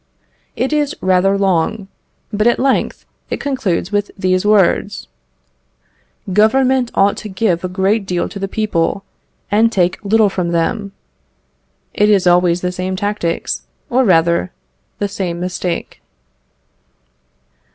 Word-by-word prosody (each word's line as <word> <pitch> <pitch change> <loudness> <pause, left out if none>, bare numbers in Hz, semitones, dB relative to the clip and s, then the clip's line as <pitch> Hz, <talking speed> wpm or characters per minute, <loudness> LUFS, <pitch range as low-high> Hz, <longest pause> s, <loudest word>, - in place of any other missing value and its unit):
It 265 +4 -1
is 295 -2 0
rather 185 +1 +2
long, 195 +2 0 0.5
but 210 +2 +2
at 240 - +3
length 270 0 0 0.2
it - - -3
concludes 210 -10 -2
with 205 -1 0
these 185 -1 +1
words: 210 -4 +2 1.3
"Government 255 +4 +3
ought 200 +1 +3
to 215 - -7
give 190 -3 0
a - - -1
great 195 +2 0
deal 180 -2 -1
to 200 - -8
the 195 - -2
people, 195 -3 -1 0.5
and 225 +2 +3
take 180 -1 0
little 215 +1 +3
from 175 -2 -2
them." 200 +5 -1 1.0
It 210 +1 +2
is 200 -3 +3
always 175 0 +3
the 180 - -1
same 185 +1 -3
tactics, 205 -4 -2 0.2
or, 255 +2 +3
rather, 170 -3 +2 0.5
the 205 - -1
same 185 -4 -4
mistake. 180 -1 -4
195 Hz, 130 wpm, -17 LUFS, 180-215 Hz, 1.3 s, at